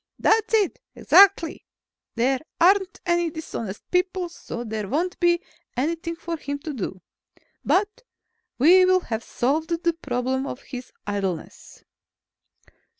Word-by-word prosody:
"That's 445 Hz, 0 st, +2 dB
it, 415 Hz, -4 st, +1 dB, 0.2 s
exactly. 390 Hz, -5 st, +5 dB, 0.5 s
There 255 Hz, +3 st, +2 dB, 0.2 s
aren't 380 Hz, +2 st, +3 dB
any 345 Hz, -1 st, +2 dB
dishonest 230 Hz, -10 st, -6 dB
people, 365 Hz, 0 st, 0 dB
so 240 Hz, -7 st, -7 dB
there 215 Hz, -3 st, -4 dB
won't 335 Hz, -, -1 dB
be 345 Hz, 0 st, +3 dB, 0.3 s
anything 330 Hz, +5 st, -1 dB
for 335 Hz, 0 st, -5 dB
him 285 Hz, -2 st, -4 dB
to 310 Hz, -1 st, -5 dB
do. 190 Hz, -6 st, -5 dB, 0.6 s
But 410 Hz, +2 st, +1 dB, 0.6 s
we 350 Hz, +8 st, +7 dB
will 370 Hz, 0 st, +4 dB
have 225 Hz, -7 st, -4 dB
solved 300 Hz, +7 st, -1 dB
the 340 Hz, 0 st, 0 dB
problem 260 Hz, -3 st, -2 dB
of 265 Hz, -, -7 dB
his 250 Hz, -1 st, -8 dB
idleness." 195 Hz, -5 st, -5 dB
325 Hz, 125 wpm, -24 LUFS, 250-355 Hz, 0.6 s, we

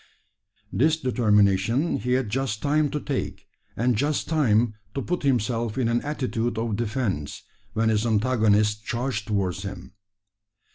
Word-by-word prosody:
This 155 Hz, +10 st, +3 dB
determination 115 Hz, -, +2 dB
he 125 Hz, 0 st, -1 dB
had 130 Hz, -2 st, +1 dB
just 120 Hz, -2 st, -2 dB
time 150 Hz, +1 st, +2 dB
to 150 Hz, -, -2 dB
take, 140 Hz, -2 st, -4 dB, 0.3 s
and 120 Hz, +2 st, +2 dB
just 145 Hz, +6 st, 0 dB
time 120 Hz, -8 st, +2 dB, 0.2 s
to 135 Hz, -, -1 dB
put 180 Hz, 0 st, -2 dB
himself 120 Hz, -3 st, 0 dB
in 125 Hz, -3 st, +1 dB
an 120 Hz, +1 st, +1 dB
attitude 120 Hz, -6 st, -2 dB
of 115 Hz, -2 st, -1 dB
defence, 110 Hz, -, -2 dB, 0.3 s
when 110 Hz, 0 st, +2 dB
his 110 Hz, -1 st, +2 dB
antagonist 110 Hz, -2 st, +2 dB
charged 120 Hz, -3 st, -2 dB
towards 95 Hz, -3 st, -1 dB
him. 95 Hz, -2 st, -8 dB
115 Hz, 140 wpm, -25 LUFS, 105-130 Hz, 0.3 s, This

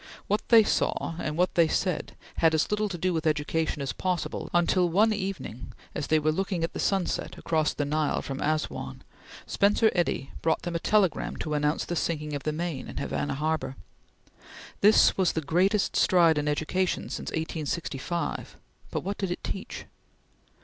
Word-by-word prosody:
What 210 Hz, +2 st, 0 dB
they 230 Hz, -2 st, +8 dB
saw 170 Hz, -, 0 dB
and 155 Hz, -2 st, -3 dB
what 180 Hz, +1 st, +2 dB
they 170 Hz, -2 st, +4 dB
said 180 Hz, +1 st, -1 dB, 0.2 s
had 160 Hz, -1 st, +4 dB
as 160 Hz, -, +1 dB
little 210 Hz, 0 st, +1 dB
to 180 Hz, -, -4 dB
do 180 Hz, +2 st, 0 dB
with 160 Hz, 0 st, -1 dB
education 150 Hz, 0 st, 0 dB
as 130 Hz, -4 st, -3 dB
possible, 180 Hz, +4 st, -2 dB
until 175 Hz, +1 st, +3 dB
one 215 Hz, +6 st, +4 dB
evening, 190 Hz, -, -5 dB, 0.2 s
as 145 Hz, -, -3 dB
they 155 Hz, -, +4 dB
were 155 Hz, 0 st, +2 dB
looking 185 Hz, 0 st, -1 dB
at 165 Hz, -, -2 dB
the -, -, -5 dB
sun 195 Hz, -3 st, +1 dB
set -, -, -4 dB
across 155 Hz, -2 st, +1 dB
the 145 Hz, -, -1 dB
Nile 150 Hz, +1 st, 0 dB
from 135 Hz, 0 st, -5 dB
Assouan, 155 Hz, -, -2 dB, 0.4 s
Spencer 210 Hz, +2 st, +3 dB
Eddy 170 Hz, -6 st, -1 dB
brought 160 Hz, -1 st, +1 dB
them 175 Hz, -, -3 dB
a 170 Hz, -, 0 dB
telegram 200 Hz, -1 st, +1 dB
to 155 Hz, -, -4 dB
announce 150 Hz, +1 st, 0 dB
the 175 Hz, -, -3 dB
sinking 150 Hz, -3 st, -2 dB
of 145 Hz, -, -3 dB
the 155 Hz, -, -1 dB
Maine 160 Hz, -4 st, -4 dB
in -, -, -8 dB
Havana 145 Hz, -1 st, -2 dB
Harbor. 155 Hz, -2 st, -1 dB, 1.0 s
This 210 Hz, +2 st, +6 dB
was 185 Hz, -3 st, +2 dB
the 160 Hz, -, -1 dB
greatest 185 Hz, +7 st, +1 dB
stride 170 Hz, -4 st, +4 dB
in 150 Hz, -, -2 dB
education 160 Hz, +5 st, 0 dB
since -, -, -4 dB
1865, 160 Hz, 0 st, -3 dB, 0.3 s
but -, -, -3 dB
what 200 Hz, +2 st, -4 dB
did 195 Hz, -, -1 dB
it 175 Hz, -, -4 dB
teach? 195 Hz, -, -5 dB
165 Hz, 180 wpm, -27 LUFS, 150-185 Hz, 1.0 s, they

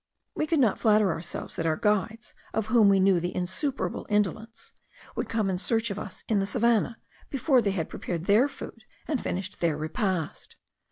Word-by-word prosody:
We 310 Hz, -, -1 dB
could 325 Hz, -, +2 dB
not 230 Hz, -7 st, +3 dB
flatter 210 Hz, -4 st, +4 dB
ourselves 165 Hz, +1 st, -6 dB
that 165 Hz, -, 0 dB
our 160 Hz, -, +2 dB
guides, 215 Hz, +4 st, 0 dB, 0.2 s
of 220 Hz, -, 0 dB
whom 220 Hz, -4 st, +7 dB
we 195 Hz, -1 st, +4 dB
knew 190 Hz, -2 st, +4 dB
the 175 Hz, +1 st, -3 dB
insuperable 190 Hz, -, -2 dB
indolence, 215 Hz, +2 st, -1 dB, 0.4 s
would -, -, -3 dB
come 220 Hz, -3 st, 0 dB
in 185 Hz, -2 st, -1 dB
search 225 Hz, +2 st, 0 dB
of 200 Hz, -, -4 dB
us 205 Hz, -, -8 dB
in 215 Hz, -3 st, +2 dB
the 195 Hz, -, 0 dB
savannah 230 Hz, +1 st, +2 dB, 0.3 s
before 270 Hz, -1 st, +3 dB
they 205 Hz, -, 0 dB
had 180 Hz, -5 st, -1 dB
prepared 170 Hz, -1 st, -5 dB
their 215 Hz, +7 st, +5 dB
food 285 Hz, -, -10 dB, 0.2 s
and 290 Hz, -6 st, -1 dB
finished 190 Hz, +2 st, -4 dB
their 165 Hz, -3 st, +1 dB
repast. 170 Hz, +1 st, -3 dB
210 Hz, 185 wpm, -27 LUFS, 185-230 Hz, 0.4 s, whom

